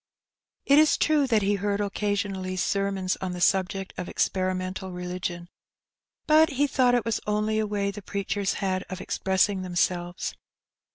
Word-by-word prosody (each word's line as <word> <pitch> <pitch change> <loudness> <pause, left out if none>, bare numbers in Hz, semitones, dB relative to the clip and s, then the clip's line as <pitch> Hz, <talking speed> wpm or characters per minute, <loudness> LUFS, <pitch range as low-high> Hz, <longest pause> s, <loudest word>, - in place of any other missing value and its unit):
It 280 +1 +6
is 310 0 +5
true 300 -3 +2
that 220 -4 +2
he 200 +1 +2
heard 205 0 0
occasionally 200 -2 -2
sermons 195 0 0
on 185 -1 -4
the 180 - -5
subject 190 +1 +1
of 180 - -4
ex - - +1
perimental 185 0 -3
religion, 180 -1 -5 0.8
but 310 0 +5
he 280 +2 +2
thought 255 -3 +3
it 240 -2 0
was 230 -2 -1
only 210 +1 +1
a 215 - 0
way 200 -1 -1
the 210 - -9
preachers 200 0 -2
had 190 -2 -1
of 185 -1 -5
expressing 190 +1 +1
themselves. 175 -1 -1
195 Hz, 160 wpm, -26 LUFS, 185-210 Hz, 0.8 s, It